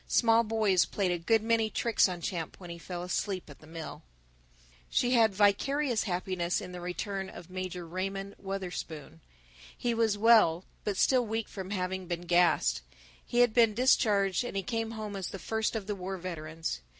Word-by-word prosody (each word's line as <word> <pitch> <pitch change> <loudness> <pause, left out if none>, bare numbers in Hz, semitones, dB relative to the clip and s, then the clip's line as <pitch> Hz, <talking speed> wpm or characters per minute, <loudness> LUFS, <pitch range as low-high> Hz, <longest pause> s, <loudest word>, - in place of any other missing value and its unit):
Small 230 -1 +4
boys 215 -5 +2
played 195 -3 -1
a 175 - -1
good 220 +6 +2
many 225 -1 +2
tricks 230 -3 +2
on 175 -1 -5
Champ 170 -3 -4
when 175 -2 -9
he 170 - -8
fell 175 +1 -6
asleep 185 +1 -2
at 140 - -14
the 155 - -16
mill. 165 0 -7
II - - -33 0.3
She 245 - +1
had 230 -3 +5
vicarious 235 +5 +2
happiness 180 -2 -1
in 180 - -8
the 180 -1 -7
return 190 +2 -4
of 175 -1 -11
Major 185 -1 -5
Raymond 195 +3 -4
Wutherspoon. 180 - -6 0.6
He 240 - 0
was 225 -2 +1
well, 210 -6 +5 0.2
but 205 -2 -2
still 255 +3 +4
weak 225 +1 -2
from 190 -2 -7
having 190 -1 -3
been 175 -1 -3
gassed; 175 - +3 0.4
he 240 - +1
had 245 -3 +4
been 230 -3 +4
discharged 210 -6 +3
and 245 - -4
he 195 - -1
came 225 +2 -2
home 215 -2 -6
as 190 -2 -3
the - - -6
first 220 +3 -2
of 215 -3 -3
the 210 - -2
war 190 0 -5
veterans. 165 - -5
190 Hz, 185 wpm, -30 LUFS, 175-220 Hz, 0.6 s, had